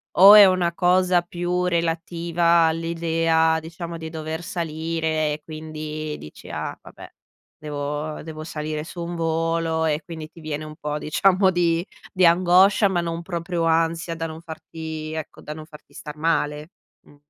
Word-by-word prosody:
o 195 +3 +10
è 210 -1 +11
una 180 -2 +2
cosa 180 0 +3
più 175 +1 -2
relativa 170 0 +1
all'idea, 165 0 +1
diciamo, 165 +1 -7
di 160 -1 -7
dover 160 +1 -5
salire 160 -2 -2
e 150 - -7
quindi 155 -1 -6
dici: 75 - -12
"Ah - - -4
vabbè. - - -13 0.5
Devo 150 +1 -4
devo 155 -1 -7
salire 155 -1 -4
su 175 +1 -8
un 170 +1 -5
volo" 165 0 0
e 155 0 0
quindi 160 -2 -8
ti 165 - -15
viene 155 0 -4
un 155 0 -9
po', 150 -1 -4
diciamo 185 +5 +3
di 170 0 +1 0.3
di 185 -2 +3
angoscia, 185 +4 +5
ma 175 -2 0
non 170 0 -3
proprio 170 -1 -3
ansia 165 +1 +1
da 165 0 -4
non 160 0 -7
farti 160 -1 -7
ecco, 160 -2 -7
da 150 - -7
non 155 0 -9
farti 150 -2 -16
star 150 0 -9
male. 150 0 -1 0.3
Mh. 145 - -19
165 Hz, 160 wpm, -23 LUFS, 155-170 Hz, 0.5 s, è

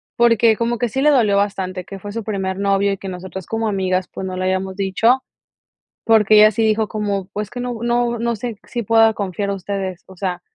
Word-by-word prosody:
porque 230 -2 +4
como 235 0 -1
que 245 - 0
sí 265 +5 -2
le 300 - +5
dolió 220 -8 +3
bastante, 190 -2 -2
que 195 0 -9
fue 205 +1 -7
su 225 +2 -4
primer 195 -3 -3
novio 200 0 +1
y - - -5
que 195 - -7
nosotras 185 0 -7
como 225 +2 -2
amigas, 185 -2 0
pues, 190 - -6
no 185 -1 -4
le 185 0 -2
hayamos 190 0 -1
dicho, 205 +6 +2 0.8
porque 215 -2 +5
ella 215 0 +7
sí 225 - -1
dijo 220 0 +2
como: 205 -3 -2
"Pues, 210 0 -4
que 245 - -7
no 245 -1 -4
no 240 0 0
no 235 0 0
sé, 225 0 -5
si 240 -1 -4
pueda 225 +1 +5
confiar 200 -1 -3
en 200 - -1
ustedes, 190 -1 -5
o 190 - -14
sea, 180 -1 -3
205 Hz, 230 wpm, -19 LUFS, 190-225 Hz, 0.8 s, ella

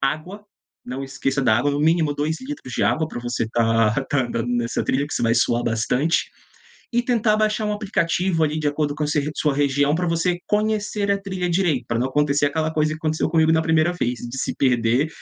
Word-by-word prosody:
Água, 155 +9 -3 0.4
não 130 +2 -5
esqueça 135 0 -2
da 110 -4 +4
água, 145 +4 +1
no 145 - -1
mínimo 160 -1 +2
2 155 +3 -1
litros 260 - -7
de - - 0
água 140 +10 +1
pra - - -6
você 120 -2 -2
tá 115 -1 +2 0.2
tá 140 - +1
andando 115 0 -3
nessa 120 -1 -1
trilha, 140 +2 0
que - - -7
você - - -1
vai 115 0 +3
suar 120 0 +1
bastante, 125 +8 0 0.6
e 240 +1 +2
tentar 230 -3 +2
baixar 215 0 0
um 210 - 0
aplicativo 185 -4 0
ali 155 +1 -1
de 155 - -2
acordo 145 0 -1
com 150 - -1
se 150 0 0
sua 150 -2 +1
região, 145 +1 +2
pra 175 +1 0
você 170 +2 0
conhecer 210 -1 0
a 200 - +3
trilha 185 -2 -3
direito. 170 -8 +1
Pra 115 - -1
não 130 - 0
acontecer 145 +1 +2
aquela 155 +2 -1
coisa 155 -1 +1
que - - -4
aconteceu 155 0 -1
comigo 160 -1 +3
na 160 0 +3
1ª 160 +1 +2
vez, 125 -8 -2
de 120 - -7
se - - -2
perder 125 +2 +2
150 Hz, 215 wpm, -22 LUFS, 130-175 Hz, 0.6 s, da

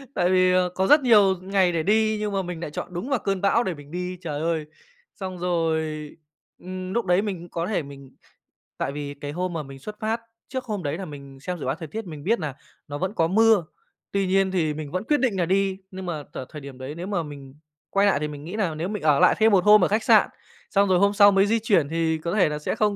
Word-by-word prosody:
tại 175 - +2
vì 185 0 +4 0.2
có 190 +1 +1
rất 295 +1 +7
nhiều 205 -7 +5
ngày 190 -1 +2
để 165 -2 -1
đi 220 +3 +2
nhưng 210 -1 -2
mà 195 - +1
mình 175 -2 -6
nại 165 -3 -5
chọn 175 +4 -6
đúng 180 +10 -4
vào 270 -4 +1
cơn 195 -2 -2
bão 215 +4 +3
để 185 - -2
mình 145 -1 -13
đi. 180 +1 -4
Trời 150 -4 -4
ơi! 160 -1 -1 0.5
Xong 185 -2 -6
rồi, 160 -3 -1 0.5
ưm, 185 0 -6
núc 235 -1 0
đấy 180 +1 +3
mình 185 -5 -5
có 170 +1 -3
thể 200 -7 -1
mình 140 -1 -12 0.7
tại - - -2
vì 145 0 -5
cái 145 0 -7
hôm 180 +3 -3
mà 160 -2 -3
mình 135 -1 -11
xuất 210 +9 -9
phát, 220 +2 -1 0.3
trước 260 -1 -3
hôm 210 -6 -4
đấy 145 +2 -2
là 190 - -5
mình 140 -3 -11
xem 180 +6 -4
dự - - -5
báo 130 +2 0
thời 160 -1 -8
tiết 220 +8 -6
mình 150 -3 -8
biết 225 +3 +1
nà 150 -6 -4 0.3
nó 145 - -5
vẫn 185 +5 -2
có 165 - +2
mưa, 215 -1 +4 0.5
tuy 200 -1 0
nhiên 190 0 +2
thì 160 -5 0
mình 150 -2 -6
vẫn 185 +3 -2
quyết 295 +6 +1
định 245 -7 +1
nà 180 - +1
đi, 190 +1 +1
nhưng 190 0 -7
mà 155 -5 -4
tở 130 - -5
thời 150 - -9
điểm 140 -2 -10
đấy, 130 +3 -7
nếu 175 +3 -6
mà 185 -5 -1
mình 140 -2 -10 0.4
quay 200 +1 +3
nại 195 - +3
thì 150 - -2
mình 145 -1 -8
nghĩ 180 +5 -6
nà 190 -8 -1
nếu 165 +4 -3
mình 210 -4 -4
ở 150 -3 +4
lại - - +5
thêm 220 0 +5
một 190 -3 +4
hôm 210 -1 +7
ở - - +2
khách 215 +2 0
sạn, - - +5 0.4
xong 200 -1 +3
rồi 180 -1 +4
hôm 200 +1 +3
sau 205 0 +7
mới 195 0 +4
di 225 +2 +2
chuyển 195 -10 +2
thì 160 0 0
có 170 +5 -3
thể 185 -7 +4
là 150 - -3
sẽ 150 - -2
không 210 -1 +1
180 Hz, 270 wpm, -24 LUFS, 155-200 Hz, 0.7 s, rất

